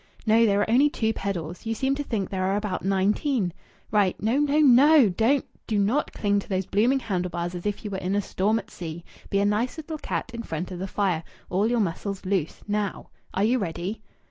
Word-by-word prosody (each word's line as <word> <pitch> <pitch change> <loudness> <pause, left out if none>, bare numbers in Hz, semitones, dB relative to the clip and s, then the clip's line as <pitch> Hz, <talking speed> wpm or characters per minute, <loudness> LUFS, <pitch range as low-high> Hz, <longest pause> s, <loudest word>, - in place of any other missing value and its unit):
No! 225 +1 +5
There 200 -1 +3
are - - +1
only 260 +6 +4
two 225 -5 0
pedals. 180 -1 -4
You 225 - -1
seem 265 +4 +1
to 290 +1 -2
think 210 -8 -3
there 185 -1 -1
are 195 +1 +1
about 205 -2 -2
nineteen. 195 - +1 0.4
Right! 200 -3 +2
No, 230 +6 +1
no, 295 0 +2
no! 285 -2 +7
Don't 230 +9 +2 0.2
do 215 - 0
not 215 +9 +1
cling 205 -1 +1
to - - -9
those 190 -1 0
blooming 235 +9 +2
handle 180 -6 -2
bars 175 0 -3
as 175 +2 -4
if 205 +2 -3
you 205 - -4
were 190 - -3
in 190 +1 -1
a 205 - +2
storm 205 +5 +1
at - - -7
sea. 170 -1 -7 0.2
Be 200 - +1
a 200 - +3
nice 215 +8 0
little 315 0 -6
cat 255 - -3
in 235 - -4
front 175 -4 -5
of 180 - -6
the 190 - -3
fire 185 -5 0 0.3
all 200 +5 +2
your 240 -1 +2
muscles 195 +2 -3
loose. 185 -5 -1
Now! 205 -1 -2 0.3
Are 195 - +2
you 245 +4 +3
ready?" 185 +2 -4
205 Hz, 225 wpm, -25 LUFS, 185-230 Hz, 0.4 s, no